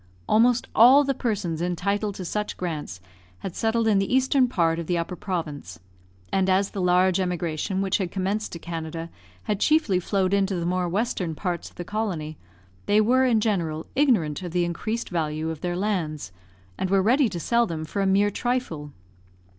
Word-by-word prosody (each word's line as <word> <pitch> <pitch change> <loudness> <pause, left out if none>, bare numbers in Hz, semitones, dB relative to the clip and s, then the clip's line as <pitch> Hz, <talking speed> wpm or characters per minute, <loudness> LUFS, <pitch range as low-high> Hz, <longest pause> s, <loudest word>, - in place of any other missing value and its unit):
Almost 235 +3 +3
all 255 +6 +7
the 275 -1 0
persons 205 -10 -2
entitled 200 +4 -1
to 185 - -6
such 210 +4 -3
grants 155 - -4 0.4
had 190 - -6
settled 225 0 +1
in 205 -3 +4
the 195 - -1
eastern 260 0 +3
part 170 -8 +1
of 170 - -5
the 175 - +1
Upper 170 +2 -3
Province, 150 - -5 0.5
and 190 0 +2
as 195 +1 +2
the 195 - -4
large 180 +1 +3
emigration 180 +1 -2
which 195 +1 +1
had 185 -3 -1
commenced 195 +4 -2
to - - -4
Canada 165 0 -6 0.3
had 205 -2 -2
chiefly 305 - +3
flowed 190 +1 0
into 195 -1 +1
the 170 -1 -2
more 180 0 0
western 185 -4 -1
part 175 0 -3
of - - -26
the 175 - -6
colony, 180 -7 -3 0.5
they 205 +1 +4
were, 255 +5 +4
in 235 -4 +3
general, 170 -8 -1
ignorant 215 - +2
of 175 -3 -6
the 175 -1 +2
increased 215 +7 -3
value 160 -1 -1
of 160 - -8
their 175 -1 -2
lands, 170 - -2 0.5
and 185 - -1
were 195 0 +3
ready 250 +4 +3
to 175 - -5
sell 235 +7 +2
them 160 -3 -4
for 200 +6 -3
a 195 - +2
mere 200 +2 +3
trifle. 195 - -3
190 Hz, 185 wpm, -25 LUFS, 170-215 Hz, 0.5 s, all